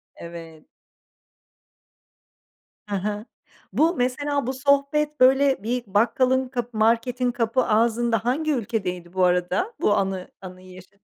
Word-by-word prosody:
Evet. 165 Hz, -2 st, -11 dB, 2.2 s
Hı 205 Hz, -, -3 dB
hı. 205 Hz, +2 st, -3 dB, 0.5 s
Bu 330 Hz, +3 st, +2 dB
mesela 280 Hz, +1 st, -1 dB
bu 260 Hz, -, -1 dB
sohbet 280 Hz, +2 st, +1 dB
böyle 265 Hz, -1 st, +4 dB
bir 245 Hz, +2 st, -2 dB
bakkalın 255 Hz, +6 st, +2 dB
kapı 245 Hz, -3 st, -4 dB
marketin 235 Hz, +3 st, +1 dB
kapı 240 Hz, +1 st, 0 dB
ağzında 225 Hz, 0 st, +1 dB
hangi 305 Hz, +6 st, 0 dB
ülkedeydi 190 Hz, -8 st, -3 dB
bu 185 Hz, -1 st, +1 dB
arada? 180 Hz, -, 0 dB
Bu 205 Hz, -, +3 dB
anı 190 Hz, -2 st, -2 dB
anıyı 185 Hz, 0 st, -11 dB
yaşa 185 Hz, +2 st, -15 dB
235 Hz, 120 wpm, -23 LUFS, 195-260 Hz, 2.2 s, böyle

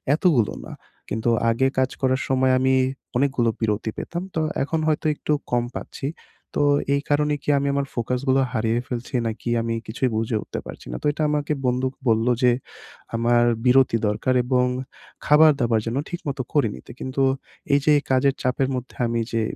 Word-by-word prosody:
এতগুলো 150 Hz, -, +2 dB
না। -, -, -9 dB, 0.4 s
কিন্তু 110 Hz, +3 st, -1 dB, 0.2 s
আগে 115 Hz, +4 st, +2 dB
কাজ 130 Hz, 0 st, +2 dB
করার 130 Hz, 0 st, +2 dB
সময় 130 Hz, 0 st, +3 dB
আমি 130 Hz, 0 st, +3 dB, 0.4 s
অনেক 140 Hz, +2 st, +3 dB
গুলো 120 Hz, -2 st, +3 dB
বিরতি 110 Hz, 0 st, 0 dB
পেতাম। 175 Hz, +1 st, -4 dB
তো 160 Hz, -, +1 dB, 0.2 s
এখন 160 Hz, +3 st, -1 dB
হয়তো 155 Hz, 0 st, 0 dB
একটু 150 Hz, -, -1 dB, 0.2 s
কম 120 Hz, -1 st, +2 dB
পাচ্ছি। 135 Hz, -, -6 dB, 0.5 s
তো -, -, +2 dB, 0.3 s
এই 140 Hz, -, 0 dB
কারণে 150 Hz, 0 st, +2 dB
কি -, -, -3 dB
আমি 140 Hz, 0 st, 0 dB
আমার 140 Hz, 0 st, -1 dB
ফোকাস 125 Hz, +2 st, -1 dB
গুলো 135 Hz, +1 st, +4 dB
হারিয়ে 115 Hz, -1 st, 0 dB
ফেলছি 120 Hz, -1 st, -5 dB
নাকি? 115 Hz, +2 st, -4 dB
আমি 115 Hz, 0 st, -2 dB
কিছুই 125 Hz, +3 st, -1 dB
বুঝে 110 Hz, +1 st, -1 dB
উঠতে -, -, -6 dB
পারছি -, -, -10 dB
না। -, -, -4 dB
তো -, -, -4 dB
এটা 150 Hz, -, -5 dB
আমাকে 150 Hz, 0 st, 0 dB
বন্দুক 130 Hz, +1 st, 0 dB
বললো 115 Hz, +2 st, +3 dB
যে, 125 Hz, -, +6 dB, 0.6 s
"আমার 120 Hz, +1 st, +3 dB, 0.2 s
বিরতি 125 Hz, -2 st, +5 dB
দরকার, 105 Hz, +5 st, 0 dB
এবং 125 Hz, 0 st, +2 dB, 0.6 s
খাবার-দাবার 145 Hz, -7 st, +5 dB
যেন 115 Hz, +3 st, -1 dB
ঠিকমত 160 Hz, -6 st, -5 dB
করে 145 Hz, -6 st, +3 dB
নিতে।" 65 Hz, -, -12 dB
কিন্তু 130 Hz, +1 st, -1 dB, 0.5 s
এই 140 Hz, -, +5 dB
যে 150 Hz, -, +5 dB, 0.2 s
কাজের 130 Hz, +1 st, +3 dB
চাপের 130 Hz, +1 st, +1 dB
মধ্যে 125 Hz, 0 st, -6 dB
আমি 115 Hz, 0 st, 0 dB
যে 115 Hz, -, +1 dB
130 Hz, 180 wpm, -23 LUFS, 115-140 Hz, 0.6 s, যে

